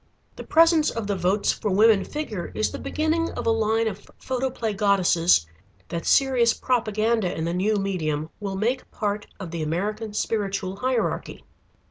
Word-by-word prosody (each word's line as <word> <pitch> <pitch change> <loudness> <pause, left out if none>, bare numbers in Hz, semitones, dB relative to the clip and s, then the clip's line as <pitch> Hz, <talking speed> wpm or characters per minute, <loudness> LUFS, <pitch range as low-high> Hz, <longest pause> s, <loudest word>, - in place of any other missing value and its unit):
The - - -8
presence 325 -1 +4
of 230 -2 -4
the 200 0 -1
"Votes 190 +3 +1
for 210 - -3
Women" 205 +1 +5
figure 225 - -5
is 215 - 0
the - - -6
beginning 320 +2 0
of - - -5
a 230 - +3
line 225 0 +1
of 205 -2 -6
photoplay 255 -4 -2
goddesses 185 - +3 0.4
that 170 -1 -4
serious 250 -4 +4
propaganda 220 -4 0
in 160 - -2
the 170 - -1
new 200 +4 +1
medium 160 -6 -2
will 200 -2 -4
make 235 +6 -1
part 205 -1 -3
of 185 -4 -7
the 170 -1 -4
American 205 +7 -3
Spiritual 195 -3 -2
Hierarchy. 250 +2 -2
210 Hz, 160 wpm, -24 LUFS, 190-230 Hz, 0.4 s, Women